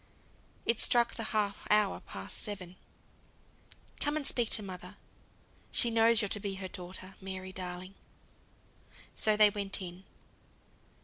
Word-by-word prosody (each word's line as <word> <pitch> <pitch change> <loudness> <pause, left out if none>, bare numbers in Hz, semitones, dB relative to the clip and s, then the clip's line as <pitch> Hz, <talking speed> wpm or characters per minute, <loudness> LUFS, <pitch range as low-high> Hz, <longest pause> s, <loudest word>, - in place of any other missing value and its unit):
It 230 - +2
struck 240 -1 +5
the 225 - -3
half 205 -2 0
hour 210 -1 +3
past 95 -1 -7
seven. 185 -4 -6 1.2
"Come 295 +1 0
and 295 - -3
speak 240 -4 +2
to 215 - +3
mother; 185 0 -8 0.8
she 235 - +3
knows 225 -1 +5
you're 205 - -1
to 205 - +1
be 195 -1 -3
her 190 0 -5
daughter, 185 +1 -7
Mary, 190 0 -6
darling." 180 +1 -6 1.2
So 215 -1 +2
they 210 -1 +7
went 200 -1 -2
in. 180 0 -7
200 Hz, 135 wpm, -32 LUFS, 185-215 Hz, 1.2 s, they